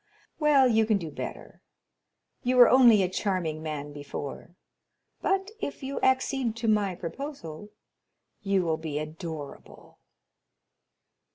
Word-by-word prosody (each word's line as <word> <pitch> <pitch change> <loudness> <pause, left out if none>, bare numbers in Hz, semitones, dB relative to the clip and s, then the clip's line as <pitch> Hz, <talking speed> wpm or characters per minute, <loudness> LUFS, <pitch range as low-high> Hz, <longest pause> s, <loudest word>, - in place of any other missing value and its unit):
"Well, 290 -4 +5
you 220 -2 +3
can 215 -2 +3
do 165 -5 -6
better. - - -8 0.8
You 250 +1 0
were 245 -1 +9
only 240 -6 +6
a - - +1
charming 180 -5 -2
man 150 -2 -5
before, 145 +3 -7 0.7
but, 390 +1 0
if 285 - -5
you 275 +1 -3
accede 260 -2 +1
to 230 0 -3
my 205 -4 +2
proposal, 185 - -7 0.7
you 195 -2 +1
will 160 -2 0
be 155 -2 -4
adorable." 155 -1 -8
195 Hz, 120 wpm, -27 LUFS, 160-255 Hz, 0.8 s, were